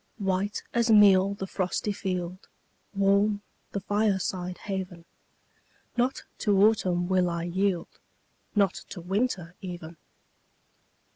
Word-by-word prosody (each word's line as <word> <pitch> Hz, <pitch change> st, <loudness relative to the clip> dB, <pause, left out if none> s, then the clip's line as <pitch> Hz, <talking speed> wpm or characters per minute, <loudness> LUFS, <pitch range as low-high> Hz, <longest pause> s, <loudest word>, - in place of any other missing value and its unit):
White 195 Hz, 0 st, -1 dB
as 235 Hz, 0 st, +2 dB
meal 200 Hz, -2 st, +6 dB
the 195 Hz, -, -4 dB
frosty 190 Hz, +2 st, -2 dB
field 185 Hz, -2 st, -4 dB, 0.5 s
Warm 200 Hz, +1 st, +3 dB, 0.3 s
the 200 Hz, -, -3 dB
fireside 190 Hz, -3 st, 0 dB
haven 185 Hz, -4 st, -5 dB, 0.9 s
Not 250 Hz, +2 st, 0 dB, 0.2 s
to 205 Hz, -3 st, +2 dB
autumn 185 Hz, -5 st, +3 dB
will 185 Hz, -1 st, +2 dB
I 170 Hz, -1 st, -2 dB
yield, 180 Hz, 0 st, -1 dB, 0.6 s
Not 200 Hz, -2 st, +3 dB, 0.2 s
to 190 Hz, -, -7 dB
winter 185 Hz, -1 st, -1 dB
even! 175 Hz, -3 st, -7 dB
190 Hz, 110 wpm, -27 LUFS, 180-205 Hz, 0.9 s, meal